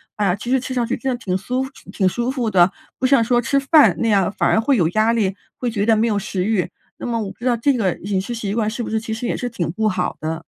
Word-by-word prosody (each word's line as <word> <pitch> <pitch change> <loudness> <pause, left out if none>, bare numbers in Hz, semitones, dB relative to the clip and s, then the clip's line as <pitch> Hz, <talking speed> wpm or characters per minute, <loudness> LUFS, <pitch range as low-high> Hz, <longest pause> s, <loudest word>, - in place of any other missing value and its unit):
啊， 200 -4 +1
其 225 +4 -7
实 265 - +3
吃 260 +1 -5
上 245 -2 0
去 - - -1
真 265 - -3
的 245 - -2
挺 190 -6 -2
酥 250 +7 -2
服 265 - -6 0.2
挺 190 - +1
舒 240 +7 -1
服 245 -5 -1
的， 185 -2 +4 0.3
不 260 - -1
像 265 -2 +5
说 240 +1 +2
吃 275 +4 +1
饭 285 +2 +5
那 230 - +1
样 200 -4 +3
反 - - 0
而 - - +3
会 270 +2 +2
有 170 -6 +3
压 215 +5 +2
力， 200 -5 0 0.2
会 245 - -1
觉 205 -3 -1
得 225 - +4
没 225 +2 +2
有 210 -3 +1
食 190 -2 -2
欲。 210 -4 0 0.3
那 - - -6
么 235 -1 -1
我 205 - -4
不 - - -16
知 240 - -7
道 245 -2 +3
这 275 +5 +2
个 195 -8 +1
饮 195 +1 -2
食 220 +5 -5
习 210 -4 -3
惯 215 -2 +1
是 235 +2 -4
不 - - -4
是 220 0 0
其 220 0 -5
实 225 +2 -4
也 - - -1
是 245 - -3
挺 180 -8 -3
不 220 +4 0
好 180 -2 -2
的？ 160 +1 -3
225 Hz, 330 characters per minute, -20 LUFS, 195-245 Hz, 0.3 s, 像